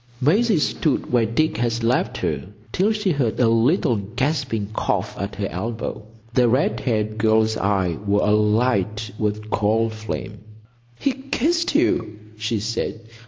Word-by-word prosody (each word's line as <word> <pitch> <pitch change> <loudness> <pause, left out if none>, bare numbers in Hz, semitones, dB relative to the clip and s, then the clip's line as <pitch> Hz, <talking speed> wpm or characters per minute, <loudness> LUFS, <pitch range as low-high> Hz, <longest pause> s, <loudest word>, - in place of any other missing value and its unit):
Maisie 200 - +3
stood 150 -1 0
where 115 -2 +3
Dick 120 +3 0
had 120 0 -1
left 120 +2 +1
her - - -2 0.3
till 195 +4 +2
she 210 -3 0
heard 135 -8 0
a 125 - +4
little 120 - +3
gasping 120 +2 -1
cough - - -1
at 100 +1 -5
her 100 - -2
elbow. 110 +6 -4 0.3
The 125 -1 +4
red 130 +5 +1
haired 110 -3 -1
girl's 110 0 +3
eyes 95 -5 0
were 100 +1 +3
alight 105 0 +1
with 105 0 -2
cold 110 +2 +1
flame. 105 -2 -6 0.6
"He 275 - +1
kissed 280 +5 0
you!" 195 - +1 0.2
she 110 +1 -2
said. 110 +1 -3
115 Hz, 145 wpm, -22 LUFS, 105-140 Hz, 0.6 s, a